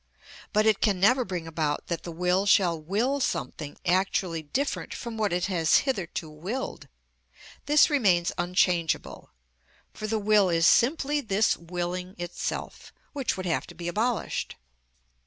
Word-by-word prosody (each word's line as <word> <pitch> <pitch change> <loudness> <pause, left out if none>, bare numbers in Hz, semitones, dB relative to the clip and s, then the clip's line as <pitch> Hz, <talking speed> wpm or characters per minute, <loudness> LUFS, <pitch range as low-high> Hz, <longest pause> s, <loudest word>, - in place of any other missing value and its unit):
But 215 0 +2
it 220 -2 +3
can 200 -4 +2
never 250 +7 +4
bring 180 -6 -5
about 155 -2 -2
that 170 -2 -3
the 170 - -7
will 180 +4 +1
shall 175 -5 +3
will 225 - 0
something 150 - -3
actually 180 -2 +1
different 265 - -3
from 235 -2 -6
what 215 -2 0
it 175 +1 0
has 170 -5 +3
hitherto 190 - -3
willed; 180 +13 -5 0.8
this 295 +1 +6
remains 195 - +2
unchangeable, 175 -2 0 0.6
for 215 - -5
the 220 +1 0
will 210 -2 +3
is 165 -1 +2
simply 290 - +3
this 215 -2 +2
willing 180 +2 -5
itself, 175 0 -5 0.2
which 275 -8 -2
would 185 - -5
have 170 - -1
to 175 - -12
be 170 +1 -6
abolished. 220 +6 -1
185 Hz, 145 wpm, -27 LUFS, 170-220 Hz, 0.8 s, this